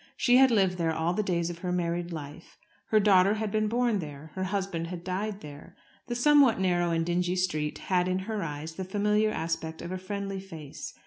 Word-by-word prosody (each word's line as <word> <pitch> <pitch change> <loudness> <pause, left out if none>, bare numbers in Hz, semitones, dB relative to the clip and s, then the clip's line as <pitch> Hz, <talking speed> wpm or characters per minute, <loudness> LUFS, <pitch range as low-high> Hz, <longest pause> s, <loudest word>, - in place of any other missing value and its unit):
She 245 0 +5
had 265 0 +7
lived 190 -6 +2
there 165 -1 +1
all 160 +2 0
the 215 - 0
days 175 -4 -1
of 170 - -9
her 180 0 -3
married 175 0 -1
life. 155 0 -9 0.3
Her 215 - +4
daughter 200 -1 +5
had 215 -1 -2
been 215 0 +1
born 235 -1 +1
there. 150 -1 -8
Her 190 0 -2
husband 190 -4 -2
had 175 0 -7
died 200 +3 -3
there. 145 -1 -11 0.3
The 240 - -3
somewhat 275 -2 +5
narrow 175 -2 +2
and 165 -1 0
dingy 175 +1 0
street 155 -5 -1
had 180 -1 0
in 185 0 +1
her 220 -2 -2
eyes 155 -1 -5
the 190 - -5
familiar 210 +3 +1
aspect 160 -3 -3
of 170 - -6
a 185 - -3
friendly 195 0 -4
face. 165 -7 -9
185 Hz, 210 wpm, -28 LUFS, 165-205 Hz, 0.3 s, had